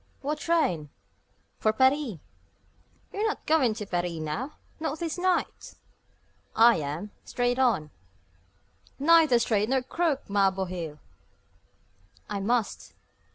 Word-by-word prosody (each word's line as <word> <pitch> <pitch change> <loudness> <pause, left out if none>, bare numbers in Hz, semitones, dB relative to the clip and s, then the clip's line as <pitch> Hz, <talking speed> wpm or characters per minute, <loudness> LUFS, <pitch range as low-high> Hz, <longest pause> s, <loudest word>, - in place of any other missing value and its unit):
"What 295 +2 -2
train?" 180 - 0 0.7
"For 215 - +3
Paris." 260 - +2 1.0
"You're 420 +2 0
not 430 - -4
going 270 -8 +3
to 210 -2 -5
Paris 175 -2 -2
now 165 - -4 0.3
not 315 -1 -2
this 335 0 -3
night?" 370 0 -1 0.8
"I 230 +1 +6
am, 155 +7 -4
straight 245 +1 -1
on." 200 - +2 1.1
"Neither 315 -3 +5
straight 215 -2 +1
nor 265 -1 +1
crooked, 310 0 -1
ma 200 -1 +3
bohil!" 180 -5 -5 1.3
"I 205 -1 -3
must." 225 +2 -1
240 Hz, 110 wpm, -27 LUFS, 190-300 Hz, 1.3 s, I